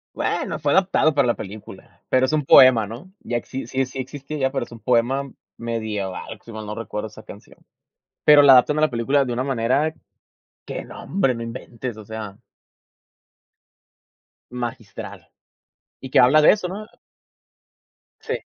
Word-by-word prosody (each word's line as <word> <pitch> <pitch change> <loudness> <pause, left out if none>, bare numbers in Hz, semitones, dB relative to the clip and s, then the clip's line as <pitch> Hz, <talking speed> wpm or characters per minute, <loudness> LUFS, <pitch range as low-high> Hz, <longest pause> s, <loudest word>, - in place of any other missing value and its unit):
Bueno, - - -2
fue - - 0
adaptado 185 -5 +3
para 140 -3 +3
la 120 - +2
película, 105 +1 -11
pero 130 0 +3
es 130 - -3
un 150 -2 +1
poema, 130 -5 +7
¿no? 120 - -10
Ya 120 - -3
exis 120 0 -6
sí 135 0 0
sí 130 +1 -9
existía 135 +1 -3
pero 135 -2 -2
es - - -19
un 115 - -11
poema 125 +4 +1 0.3
medieval, 110 -5 -4
si 115 - -11
mal 110 -1 -7
no 105 - -5
recuerdo 110 -1 -5
esa 110 +1 -14
canción. 105 -1 -14 0.7
Pero 150 -1 +8
la 140 -1 +8
adaptan 130 +4 +5
a - - +2
la 155 - +3
película 135 +4 +1
de 125 - -3
una 125 +2 -2
manera 135 +4 0 0.7
que - - -6
no - - -11
hombre, 135 -9 0
no 115 - -6
inventes, 115 0 -7
o 110 - -11
sea. 110 -2 -7 2.1
Magistral. 120 -1 -7 0.7
Y 130 - -8
que - - +3
habla 130 +5 +6
de - - +8
eso, 205 -4 -2
¿no? 205 +4 -7 1.3
Sí. - - -3
125 Hz, 165 wpm, -22 LUFS, 115-140 Hz, 2.1 s, Pero